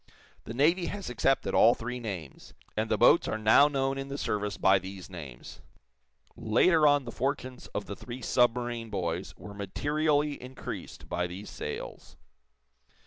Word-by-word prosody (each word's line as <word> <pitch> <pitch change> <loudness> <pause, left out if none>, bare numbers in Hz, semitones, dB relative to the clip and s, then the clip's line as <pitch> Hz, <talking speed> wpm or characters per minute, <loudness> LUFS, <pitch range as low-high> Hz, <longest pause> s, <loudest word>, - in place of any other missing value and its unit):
The 115 - -6
Navy 170 +7 +3
has 200 -9 -5
accepted 135 +3 +1
all 120 - +6
three 125 +2 -5
names, 95 - -7 0.2
and - - -1
the - - +2
boats - - +5
are - - -1
now 110 +7 +6
known 135 -1 -1
in 135 - -5
the 140 0 -5
service 105 -5 -2
by 95 0 +4
these 95 0 -9
names. 75 -9 -9 0.7
Later 150 +8 +4
on 145 -2 +3
the 120 - -5
fortunes 130 0 -3
of 105 - -2
the 100 - -6
three 125 +5 -8
submarine 120 -1 +1
boys 90 -2 -3
were 105 - -10
materially 145 +8 0
increased 130 +1 -8
by 90 0 -1
these 95 +4 -8
sales. 75 - -7
120 Hz, 155 wpm, -29 LUFS, 100-140 Hz, 0.7 s, all